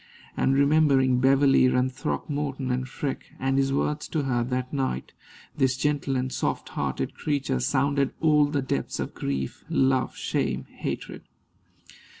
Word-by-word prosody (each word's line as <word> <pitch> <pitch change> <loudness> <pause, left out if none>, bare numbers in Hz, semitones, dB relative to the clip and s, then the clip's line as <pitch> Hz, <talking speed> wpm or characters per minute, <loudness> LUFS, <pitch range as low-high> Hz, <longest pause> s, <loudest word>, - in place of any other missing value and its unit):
And, 135 - +2
remembering 140 -3 +4
Beverley 135 0 +5
and 125 0 +2
Throckmorton 140 -1 -3
and 130 +1 -2
Freke, 135 0 -5
and 135 +1 +1
his 135 0 +1
words 145 +2 -1
to 155 -3 -1
her 120 -3 0
that 125 +1 -3
night, 130 - -2 0.4
this 130 -1 +1
gentle 140 -1 0
and 130 0 -1
soft - - -2
hearted - - -2
creature 140 -3 -1
sounded 140 +2 +1
all 150 -2 +4
the 145 -2 -1
depths 70 - -2
of - - -3
grief, 70 -1 -3
love, 130 -1 +2
shame, - - -1
hatred. - - -5
135 Hz, 145 wpm, -26 LUFS, 130-140 Hz, 0.4 s, Beverley